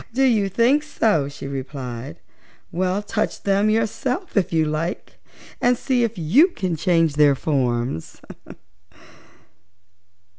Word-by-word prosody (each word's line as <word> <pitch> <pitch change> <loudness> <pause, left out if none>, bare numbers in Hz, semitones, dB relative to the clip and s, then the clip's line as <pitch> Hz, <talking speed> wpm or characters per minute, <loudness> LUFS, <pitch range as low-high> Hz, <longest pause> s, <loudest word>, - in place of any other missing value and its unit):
"Oh, - - -17
do 270 - +3
you 220 -7 +3
think 240 +9 +3
so?" 215 - 0
she 140 -1 -8
replied. 130 - -6 0.5
"Well, 185 +3 -1
touch 215 +1 -3
them 200 +1 +2
yourself, 235 - -1
if 200 -4 +1
you 160 -2 +2
like, 155 +3 -4 0.4
and 245 0 +3
see 250 -1 0
if 230 -2 -2
you 200 - +4
can 185 - -3
change 165 -3 +1
their 145 -2 +5
forms." 125 - -2
185 Hz, 125 wpm, -22 LUFS, 145-230 Hz, 0.5 s, their